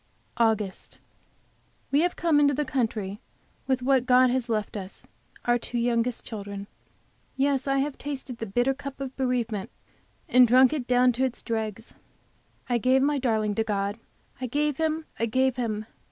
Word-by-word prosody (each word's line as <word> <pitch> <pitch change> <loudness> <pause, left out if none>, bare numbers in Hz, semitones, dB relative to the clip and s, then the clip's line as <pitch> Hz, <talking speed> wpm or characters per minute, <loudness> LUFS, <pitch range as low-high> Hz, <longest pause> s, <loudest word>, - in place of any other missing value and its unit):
AUGUST. 220 -4 0 0.9
We 280 - +4
have 350 +1 +1
come 325 -4 +3
into 285 -1 +4
the 295 +2 -1
country 220 -6 -2 0.5
with 260 -2 0
what 260 -1 +2
God 255 0 +5
has 250 -1 -1
left 215 -2 -1
us, 195 -1 -7 0.4
our 240 0 +3
two 240 - -4
youngest 235 0 0
children. 200 -2 -6 0.7
Yes, 275 0 +1
I 275 0 +2
have 275 +1 -1
tasted 270 -4 -6
the 225 - -4
bitter 245 +7 +1
cup 275 0 -8
of 270 -1 -5
bereavement, 240 -6 -1 0.6
and 250 0 +6
drunk 255 +4 +6
it 270 -5 -3
down 250 0 +4
to 250 +2 -1
its 255 -2 -2
dregs. 220 -1 -4 0.7
I 245 -1 +1
gave 260 +3 +3
my 290 0 +2
darling 220 -5 +1
to 225 - 0
God, 205 0 -2 0.4
I 255 - -1
gave 295 +2 0
him, 315 0 -1
I 230 - +1
gave 260 +2 +1
him! 220 -3 -2
250 Hz, 170 wpm, -26 LUFS, 225-270 Hz, 0.9 s, and